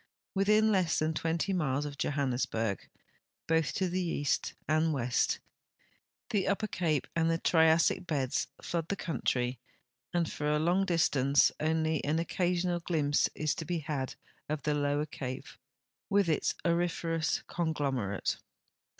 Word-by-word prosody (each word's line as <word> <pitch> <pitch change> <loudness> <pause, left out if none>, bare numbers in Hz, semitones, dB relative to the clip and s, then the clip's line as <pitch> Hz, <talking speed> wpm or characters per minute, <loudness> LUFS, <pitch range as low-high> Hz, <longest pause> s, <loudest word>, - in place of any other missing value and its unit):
M'ithin 215 +3 +4
less 185 -5 +2
than 155 +1 +1
20 165 +4 -1
miles 145 -5 0
of 145 -1 -5
Johannesburg, 125 -7 -1 0.6
both 160 -2 +2
to 190 - +1
the 180 +1 -1
east 145 -5 -1
and 155 +2 +2
west, 125 -3 +1 0.9
the 200 -3 +1
Upper 200 +2 +1
Cape 160 -8 0
and 165 0 +2
the 165 - +2
'ITiassic 165 +2 +3
beds 135 -5 0 0.2
Hood 165 -2 -2
the 200 - -1
country, 125 -7 -1 0.5
and 170 -2 +1
for 150 - -3
a 150 - +3
long 175 +5 +2
dis 170 -2 +3
tance 140 +1 +3
only 160 -1 +1
an 150 +3 +1
occasional 175 +1 0
glimpse 150 -4 +1
is 155 0 0
to - - -5
be 175 +2 -2
had 145 -4 -3 0.3
of 150 -2 -2
the 150 - +1
Lower 145 0 +1
Cape 130 -2 -6 0.6
with 200 -3 +3
its 155 - +1
auriferous 170 -1 0
conglomerate. 140 - -1
160 Hz, 140 wpm, -31 LUFS, 145-175 Hz, 0.9 s, M'ithin